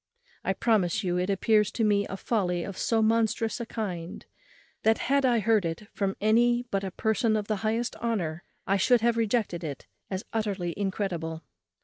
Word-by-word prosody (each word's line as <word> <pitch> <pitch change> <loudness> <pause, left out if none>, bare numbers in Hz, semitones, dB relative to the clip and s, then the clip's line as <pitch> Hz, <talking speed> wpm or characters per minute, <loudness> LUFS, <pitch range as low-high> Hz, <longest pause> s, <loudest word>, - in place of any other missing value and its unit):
I 195 - +1
promise 200 -5 +1
you, 180 -1 0
it 180 +2 -1
appears 210 +1 +3
to 230 - 0
me 205 -1 +2
a 195 - -5
folly 180 -6 0
of 195 - -6
so 225 +2 +1
monstrous 225 +1 +1
a 235 - -4
kind, 180 -8 -5 0.6
that, 220 +1 +3
had 275 0 +2
I 240 -2 +3
heard 220 -1 +3
it 165 +5 -4
from 195 -1 -1
any 240 +3 +3
but 195 0 0
a 195 - -2
person 220 +3 +1
of 210 -1 -3
the 215 - 0
highest 225 +4 -1
honour, 180 -8 -2 0.2
I 195 - +2
should 240 +4 +4
have 235 0 +3
rejected 220 -6 0
it 145 -4 -6 0.2
as 190 0 -4
utterly 200 -6 -1
incredible. 180 -5 -3
210 Hz, 185 wpm, -28 LUFS, 185-225 Hz, 0.6 s, should